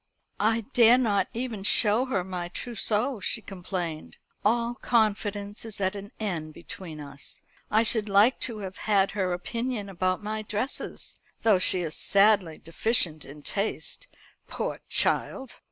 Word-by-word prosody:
"I 225 +2 +2
dare 235 0 +7
not 205 -6 +1
even 235 -3 -4
show 215 +4 +4
her 230 -9 -1
my 180 -1 -4
trousseau," 230 +4 -2
she 200 - -1
complained, 180 -5 -6 0.3
"all 235 +2 +2
confidence 210 -3 0
is 225 -3 -5
at 190 +1 0
an 200 0 -8
end 165 -8 -4
between 170 -3 -8
us. 140 -1 -7 0.3
I 220 +2 +4
should 220 -2 +2
like 205 +6 +5
to 235 -4 0
have 185 0 -8
had 195 -2 +3
her 190 -3 -1
opinion 225 +4 -3
about 185 +1 -1
my 215 +1 -3
dresses 215 +5 -4 0.2
though 215 -5 +5
she 185 0 +5
is 160 -3 -3
sadly 195 -5 +3
deficient 165 -2 +1
in 145 +1 -12
taste, 215 - -3 0.4
poor - - -4
child! 265 -3 +1
205 Hz, 145 wpm, -27 LUFS, 185-225 Hz, 0.4 s, dare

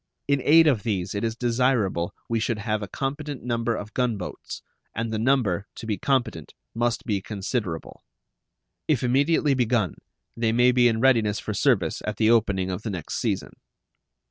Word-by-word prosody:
In 140 -1 +2
aid 160 +2 +7
of 135 -9 +3
these 95 -4 -2
it 100 - -3
is 115 -1 -1
desirable 120 -8 +1 0.2
we 115 -1 0
should 115 0 -1
have 110 0 -2
a 105 - -4
competent 140 +5 -4
number 115 -1 -1
of 105 +1 -7
gun 125 -4 0
boats, 90 - -7 0.3
and 115 0 -2
the 110 - -1
number, 110 -6 +1
to - - -8
be 105 -4 -2
competent, 125 - -1 0.2
must 120 0 -1
be 105 -4 -1
considerable. 100 -4 -4 0.9
If 145 -7 +1
immediately 140 +4 +2
begun, 120 - +1 0.4
they 115 -1 0
may 125 +1 +5
be 125 -1 +4
in 110 -1 +1
readiness 115 -5 +3
for 105 - -4
service - - +1
at 105 -1 -2
the 110 0 +4
opening 95 -5 +2
of 90 - -4
the 110 - -4
next 90 -6 -4
season. - - -2
115 Hz, 175 wpm, -25 LUFS, 105-125 Hz, 0.9 s, aid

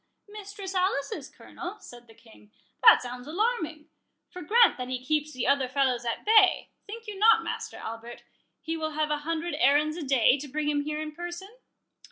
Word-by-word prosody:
Mistress 405 -2 -8
Alice's 370 -1 -1
Colonel?" 365 +4 -9
said 240 -7 -14
the 225 - -18
King—"that 225 - +2
sounds 245 +1 -8
alarming;—for 330 -3 -5
grant 460 +8 +4
that 250 - -4
he 255 0 -3
keeps 305 +1 0
the 255 -4 -4
other 280 -2 +2
fellows 255 -3 0
at 235 - -3
bay, 420 -4 +4 0.2
think 455 +2 -9
you 415 -3 -8
not, 445 +2 +5
Master - - -5
Albert, 230 +1 -8 0.4
he 325 - -3
will 315 -1 -4
have 305 0 -1
an 295 - 0
hundred 330 +2 -3
errands 300 +4 +3
a 340 - -5
day, 270 -1 +3
to 290 - -7
bring 295 +2 -3
him 290 -1 +1
here 300 +1 -4
in 310 0 -5
person?" 345 +4 -7
305 Hz, 180 wpm, -27 LUFS, 265-375 Hz, 0.4 s, not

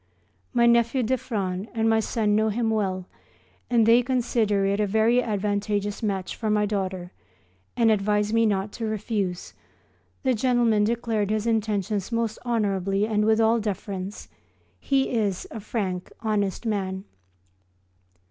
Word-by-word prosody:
My 235 - +3
nephew 235 +2 +3
d'Effran 210 -5 -2
and 225 0 +1
my 225 0 +4
son 215 -1 0
know 220 +1 +2
him 225 +1 0
well, 190 -4 -1 0.6
and 235 -2 +4
they 230 +2 +6
consider 235 -5 +1
it 200 +1 +1
a 210 - +2
very 220 +4 +3
advantageous 205 -1 -1
match 195 -4 -2
for 220 - -3
my 210 0 +2
daughter 190 -3 -3 0.7
and 230 -2 +4
advise 210 0 +1
me 230 0 +4
not 200 0 -1
to 225 - -5
refuse. 205 -4 -3 0.7
The 260 -1 +2
gentleman 235 -3 +2
declared 225 -2 -1
his 215 0 0
intentions 210 -2 -1
most 230 -1 -1
honourably 200 -4 0
and 210 -1 +1
with 220 0 +3
all 225 +1 +4
deference. 200 -2 -5 0.5
He 270 -1 +1
is 210 -6 -1
a 225 - -6
frank, 195 -4 -3
honest 210 -1 -1
man. 190 -3 -2
215 Hz, 140 wpm, -25 LUFS, 200-230 Hz, 0.7 s, they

